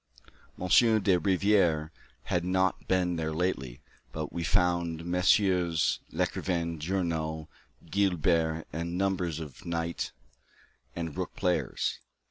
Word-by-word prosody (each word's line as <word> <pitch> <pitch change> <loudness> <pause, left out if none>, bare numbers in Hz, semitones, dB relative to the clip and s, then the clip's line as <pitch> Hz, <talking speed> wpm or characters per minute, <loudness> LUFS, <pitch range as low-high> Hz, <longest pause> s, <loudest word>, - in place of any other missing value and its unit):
M. 90 - -3
de 110 -3 +5
Rivière 90 -4 +2 0.3
had 90 -1 -1
not 95 +1 0
been 90 -2 +1
there 80 -1 -2
lately, 75 -7 -2 0.3
but 75 -1 -5
we 85 - -3
found 85 0 +1
Messrs. 90 -2 +2
Lecrivain, 85 -3 -1
Journoud, 80 -2 -2 0.4
Guibert, 85 -3 +1
and 85 +2 -3
numbers 90 -4 0
of 75 -5 -9
knight 85 0 -3 0.8
and 80 -3 -4
rook - - -4
players. 90 -1 -1
85 Hz, 105 wpm, -29 LUFS, 80-90 Hz, 0.8 s, de